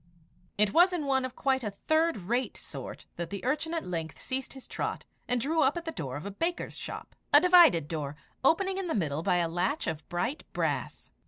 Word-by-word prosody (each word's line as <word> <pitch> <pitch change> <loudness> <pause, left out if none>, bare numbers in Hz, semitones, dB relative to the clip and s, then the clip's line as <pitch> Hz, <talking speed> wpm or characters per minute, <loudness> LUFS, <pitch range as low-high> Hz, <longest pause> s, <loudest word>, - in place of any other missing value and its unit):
It 210 -1 +3
was 360 +2 +6
in 325 -5 -1
one 265 -1 +2
of 255 - -7
quite 265 -2 +1
a 210 - -1
third 315 +10 +1
rate 235 +7 -1
sort - - -8
that 170 -1 -4
the 200 +2 -6
urchin 300 +5 0
at 330 - -2
length 165 -3 -4
ceased 260 0 -4
his 265 -1 -11
trot, - - -3 0.2
and 245 - +2
drew 315 +6 +1
up 275 +5 +3
at 340 - -5
the 325 - -2
door 135 - -5
of 150 - -8
a 200 - -4
baker's 335 - -2
shop - - -7 0.2
a - - +10
divided 345 - +6
door, 150 -3 -4 0.3
opening 380 +6 +3
in 380 - -3
the 325 - -1
middle 155 -6 0
by 175 - +2
a 170 -1 +2
latch 180 - -1
of 155 -1 -4
bright 230 - -2
brass. - - -2
255 Hz, 220 wpm, -29 LUFS, -, 0.3 s, a